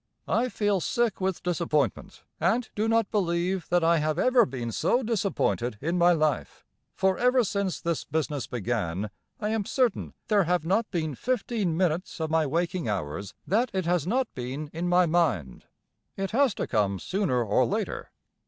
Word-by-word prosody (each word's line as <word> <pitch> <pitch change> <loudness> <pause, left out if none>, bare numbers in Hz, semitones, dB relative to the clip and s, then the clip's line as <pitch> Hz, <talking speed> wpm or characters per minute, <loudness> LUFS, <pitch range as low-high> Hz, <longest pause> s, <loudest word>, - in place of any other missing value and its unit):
I 245 +3 +1
feel 205 -5 0
sick 235 -1 0
with 190 -1 -1
disappointment, 160 - -1 0.2
and 220 +8 +1
do 215 +2 0
not 225 -2 +2
believe 180 -2 0
that 175 -1 +3
I 165 0 +4
have 155 +1 0
ever 250 +4 +4
been 120 -3 -4
so 245 - +1
disappointed 195 - 0
in 165 +7 -1
my 175 0 +5
life, 155 -4 -1 0.3
for 190 -1 +1
ever 250 0 +4
since 200 -3 -1
this 170 -2 -2
business 150 -3 -2
began 105 -5 -2 0.3
I 210 - -1
am 220 -1 0
certain 245 0 0
there 205 -4 +3
have 175 -1 +1
not 210 +6 +1
been 160 -5 -2
fifteen 220 - -1
minutes 180 0 -1
of 160 -1 -2
my 160 -2 +2
waking 170 +1 -1
hours 95 0 -4
that 225 - +1
it 190 -2 -1
has 175 -2 +1
not 255 +6 +1
been 135 +4 -5
in 170 +2 -2
my 180 0 +5
mind. 155 - 0 0.5
It 195 0 -2
has 255 -2 +3
to - - -2
come 100 -4 +1
sooner 170 - 0
or 105 -2 +2
later. - - -3
175 Hz, 170 wpm, -27 LUFS, 150-205 Hz, 0.5 s, my